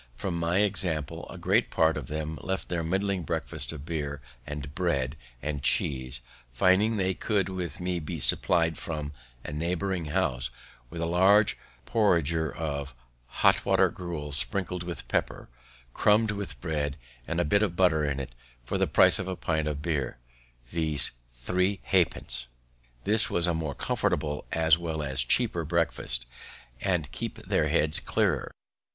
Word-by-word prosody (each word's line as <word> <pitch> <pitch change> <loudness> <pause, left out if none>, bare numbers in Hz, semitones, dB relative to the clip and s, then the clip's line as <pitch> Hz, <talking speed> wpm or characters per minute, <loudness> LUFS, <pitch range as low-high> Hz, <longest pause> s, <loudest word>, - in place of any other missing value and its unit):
From 85 +4 -3
my 85 +4 +2
example, 85 -6 -1
a - - -8
great - - +2
part 80 0 +3
of 75 -5 -5
them 80 +1 -4
left 95 0 -3
their 85 -2 -1
muddling 95 +3 0
breakfast 80 - -2
of 75 -3 -8
beer, 75 -3 -3 0.3
and 75 0 -6
bread, 75 -7 0 0.3
and 75 -2 -2
cheese, 65 -2 +1 0.3
finding 95 - +3
they 95 -1 +1
could 100 0 0
with 90 -2 -4
me 90 0 -1
be 80 +1 -5
supply'd 80 +5 +3
from 75 -5 -4 0.3
a 75 - -6
neighbouring 90 +3 -1
house 75 -7 0 0.4
with 85 0 -6
a - - +1
large 95 +5 +4 0.3
porringer 85 -7 +2
of 70 -4 -4 0.3
hot - - +3
water - - +4
gruel, 85 -5 -6
sprinkled 90 +4 -1
with 85 -3 -5
pepper, - - -2 0.4
crumb'd 105 +1 +3
with 100 -1 -5
bread, 75 -4 -2 0.3
and - - -1
a - - +2
bit 100 +8 +3
of 100 -5 0
butter 85 -4 +3
in 70 -2 -1
it, 65 -2 -6 0.3
for - - -2
the - - +3
price - - +6
of 95 - -3
a 95 - -2
pint 80 -3 -1
of 75 -1 -3
beer, 75 -7 -1 0.5
viz., 80 -2 +1 0.2
three 90 +11 0
half 90 -4 +3
pence. - - -2 0.6
This 110 +1 +5
was 85 - +1
a 90 - +1
more 80 -4 -3
comfortable 75 -1 -1
as 80 0 +4
well 80 -3 -3
as 65 -2 +1
cheaper 85 - +2
breakfast, 80 -7 -1 0.6
and 90 -8 0
keep - - -4
their - - +2
heads 75 0 +3
clearer. - - 0
80 Hz, 160 wpm, -28 LUFS, 75-90 Hz, 0.6 s, price